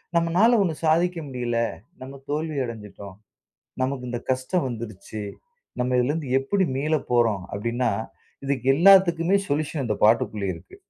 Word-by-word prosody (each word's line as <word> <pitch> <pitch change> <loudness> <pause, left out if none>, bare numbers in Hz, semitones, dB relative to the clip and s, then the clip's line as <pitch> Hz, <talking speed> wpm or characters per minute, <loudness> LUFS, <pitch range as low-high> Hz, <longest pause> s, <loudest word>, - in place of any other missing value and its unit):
நம்மனால 180 +8 +4
ஒண்ணு 170 -4 +1
சாதிக்க 170 +3 +2
முடியல, 120 -3 -3 0.4
நம்ம 135 +1 -9
தோல்வி 155 0 -2
அடஞ்சுட்டோம், 105 -4 -9 0.7
நமக்கு 130 -1 -2
இந்த 120 -1 -3
கஷ்டம் 130 +5 0
வந்துருச்சு, 110 -2 -7 0.6
நம்ம 125 0 +1
இதுலருந்து 140 +2 -1
எப்டி 190 +8 +1
மீள 155 +3 0 0.2
போறோம்? 115 -6 +2
அப்டின்னா, 115 +3 -1 0.5
இதுக்கு 135 -2 -2
எல்லாத்துக்குமே 180 0 +5
சொல்யூஷன் 145 0 -1
இந்த 105 -2 -1
பாட்டுக்குள்ளேயே 105 -3 +2
இருக்கு. 385 - -15
135 Hz, 125 wpm, -24 LUFS, 115-165 Hz, 0.7 s, எல்லாத்துக்குமே